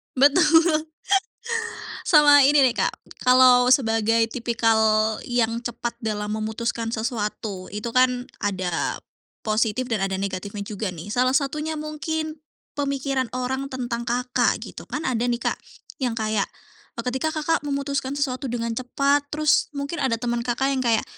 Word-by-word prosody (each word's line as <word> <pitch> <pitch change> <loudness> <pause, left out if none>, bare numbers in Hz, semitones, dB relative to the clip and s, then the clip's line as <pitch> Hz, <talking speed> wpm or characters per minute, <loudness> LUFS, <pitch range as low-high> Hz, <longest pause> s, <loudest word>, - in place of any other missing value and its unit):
Betul. 315 +3 +4 1.2
Sama 290 -3 +7
ini 290 -1 +5
nih 255 -3 +3
Kak, - - 0 0.3
kalau 250 -1 +6
sebagai 225 -3 +3
tipikal 230 -2 +1 0.5
yang 235 -1 +1
cepat 235 0 -4
dalam 210 -3 -3
memutuskan 225 +1 -3
sesuatu, 215 -4 -3
itu 210 +3 -4
kan 250 0 +3 0.2
ada 185 -4 -2 0.4
positif 220 +3 0
dan 210 -4 0
ada 190 - -3
negatifnya 200 +1 -4
juga 205 -1 -4
nih. 170 +5 -8
Salah 255 +3 +2
satunya 300 +3 -1
mungkin 310 +1 -4 0.4
pemikiran 275 -2 -1
orang 265 +2 -2
tentang 240 -2 -4
Kakak 250 +1 +1
gitu - - -10
kan, 300 - -4
ada 240 -2 0
nih 240 -1 -1
Kak - - 0 0.4
yang 245 -4 -1
kayak, 215 -2 0 0.5
e - - -9
ketika 265 +6 -2
Kakak 310 +1 +1
memutuskan 280 -1 -2
sesuatu 270 -1 -2
dengan 235 -1 -2
cepat, 280 +4 0
terus 305 +1 +2
mungkin 280 +4 -4
ada 265 -5 +1
teman 240 +1 -2
Kakak 250 +3 0
yang 265 - 0
kayak, 230 -3 +2
250 Hz, 140 wpm, -23 LUFS, 225-280 Hz, 1.2 s, Sama